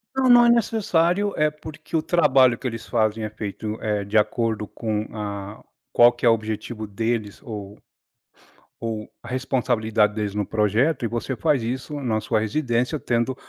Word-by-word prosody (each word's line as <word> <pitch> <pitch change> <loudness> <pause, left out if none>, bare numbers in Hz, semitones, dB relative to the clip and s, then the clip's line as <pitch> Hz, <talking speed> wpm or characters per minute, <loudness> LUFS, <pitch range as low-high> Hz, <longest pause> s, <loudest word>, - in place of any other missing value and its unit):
Não, 265 -1 +2
não 240 -1 +8
é - - +5
necessário, 205 -4 +2
eh, 155 0 +2
porque 155 +1 -9
o - - +1
trabalho 135 -7 +4
que 130 - -4
eles 115 -2 -5
fazem 110 -2 0
é 110 - -3
feito, 110 0 -5
eh, 105 -2 -1
de 100 +2 -6
acordo 110 0 0
com 110 -1 -3
a 100 -1 -6 0.3
qual 120 0 +7
que 120 - -17
é 120 - +6
o - - +6
objetivo 110 0 -4
deles 110 0 -3
ou 105 -3 -7 1.0
ou 110 -2 -4
a 120 - -11
responsabilidade 115 -4 +1
deles 105 -2 -3
no 105 0 0
projeto. 110 +8 +1
E - - 0
você 120 +4 -3
faz 150 -4 +1
isso 130 +5 -4
na 110 -4 0
sua 110 +1 0
residência, 120 +4 0
tendo 120 +2 0
115 Hz, 175 wpm, -23 LUFS, 110-135 Hz, 1.0 s, não